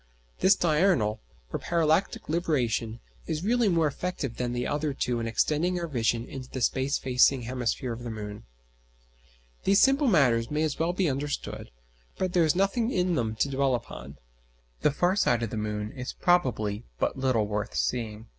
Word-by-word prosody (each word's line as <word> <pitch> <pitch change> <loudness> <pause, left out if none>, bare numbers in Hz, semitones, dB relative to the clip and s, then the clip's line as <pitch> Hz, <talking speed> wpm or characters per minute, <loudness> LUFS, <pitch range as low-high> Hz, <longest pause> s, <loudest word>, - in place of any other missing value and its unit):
This 190 +1 +5
diurnal 155 - +2 0.3
or - - -1
parallactic 170 +2 +1
libration 125 -9 -1 0.3
is 160 0 -2
really 235 +1 +2
more 165 -3 +2
effective 150 -4 -3
than 125 -1 -2
the 120 0 -2
other 145 -1 -1
two 120 -3 -1
in 115 - -2
extending 155 +10 +1
our 170 - -2
vision 120 -4 0
into 130 -1 -8
the 130 - -5
space 130 +4 +1
facing 130 0 +3
hemisphere 125 0 -2
of 115 - -8
the 120 - -5
moon. 105 -1 -7 1.2
These 195 0 +4
simple 275 +1 +4
matters 125 - +3
may 150 +1 0
as 155 -2 -2
well 165 +2 +1
be 185 -1 +1
understood, 140 +1 -3 0.5
but 185 -1 -1
there 175 - +4
is 155 - +2
nothing 195 +5 +1
in 180 -6 +1
them 115 -7 -1
to 140 - +2
dwell 135 -1 +2
upon. 70 - -8 0.6
The - - +4
far 175 +6 +1
side 120 - +2
of 115 - -3
the - - -4
moon 105 0 -3
is 125 -1 -6
probably 120 - +1
but - - 0
little 130 -5 +2
worth 105 0 -3
seeing. 115 -2 -2
135 Hz, 175 wpm, -27 LUFS, 115-175 Hz, 1.2 s, This